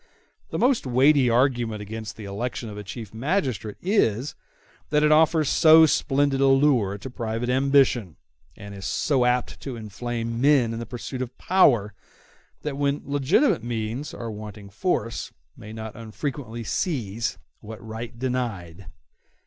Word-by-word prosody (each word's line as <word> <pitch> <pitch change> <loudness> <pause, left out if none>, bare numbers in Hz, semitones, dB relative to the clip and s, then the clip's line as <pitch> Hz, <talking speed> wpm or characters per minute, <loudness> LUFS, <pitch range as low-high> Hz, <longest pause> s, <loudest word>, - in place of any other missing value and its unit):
The - - -3
most 250 - +2
weighty 130 +1 +4
argument 120 -3 +1
against 110 +1 -7
the 110 - -8
election 115 +3 -4
of 105 - -8
a - - -7
chief 110 +1 -8
magistrate 125 - -2
is, 145 - +1 0.6
that 150 0 +2
it 150 - +4
offers 155 0 +4
so 160 +2 +7
splendid 140 -2 +1
a 135 - +5
lure 135 -8 +3
to 105 - -9
private 115 0 -3
ambition, 130 - +2 0.4
and 100 0 -9
is 100 -1 -8
so 130 -4 +1
apt 125 0 0
to 135 -3 -6
inflame 115 +2 -4
men 135 -5 +4
in 115 - -4
the 115 - -6
pursuit 125 +1 -6
of 125 -1 -6
power, 120 - +3 0.7
that 150 -2 -3
when 140 0 0
legitimate 140 - +2
means 120 +4 -4
are 115 -1 -6
wanting 105 -1 -9
force 115 - -2 0.2
may 110 -3 -11
not 110 -1 -7
unfrequently 115 +1 -5
seize 115 - -2 0.2
what 110 -1 -9
right 115 +2 -7
denied. 110 -9 -4
120 Hz, 150 wpm, -24 LUFS, 110-140 Hz, 0.7 s, so